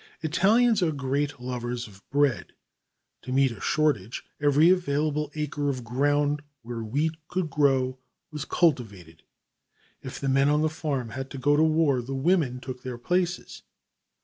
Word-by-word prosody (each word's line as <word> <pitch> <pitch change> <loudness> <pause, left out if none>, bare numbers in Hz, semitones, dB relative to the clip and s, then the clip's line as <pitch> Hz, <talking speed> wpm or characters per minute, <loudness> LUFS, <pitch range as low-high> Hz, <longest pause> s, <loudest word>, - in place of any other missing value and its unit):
Italians 215 +7 +3
are 170 -3 +2
great 140 0 -2
lovers 125 -1 -4
of 100 -2 -16
bread. 145 -2 +1 0.7
To 125 - -7
meet 135 0 +3
a 115 - -10
shortage, 140 -9 0 0.2
every 145 +4 +5
available 150 -4 0
acre 150 -1 -2
of 130 -3 -3
ground 145 +4 +1 0.2
where 115 -1 -5
wheat 145 +9 0 0.2
would 180 -5 -1
grow 135 -3 +2 0.3
was 150 -2 -4
cultivated. 100 - -1 0.8
If - - -7
the 140 - -3
men 135 +1 +3
on 150 +1 +2
the 155 - +2
farm 145 -6 -3
had 135 +1 -5
gone 145 +2 +3
to 155 - +4
war, 155 -5 +2
the 135 +3 -5
women 140 -3 +1
took 125 -1 -7
their 125 -2 -6
places. 175 +6 -2
140 Hz, 150 wpm, -26 LUFS, 125-155 Hz, 0.8 s, every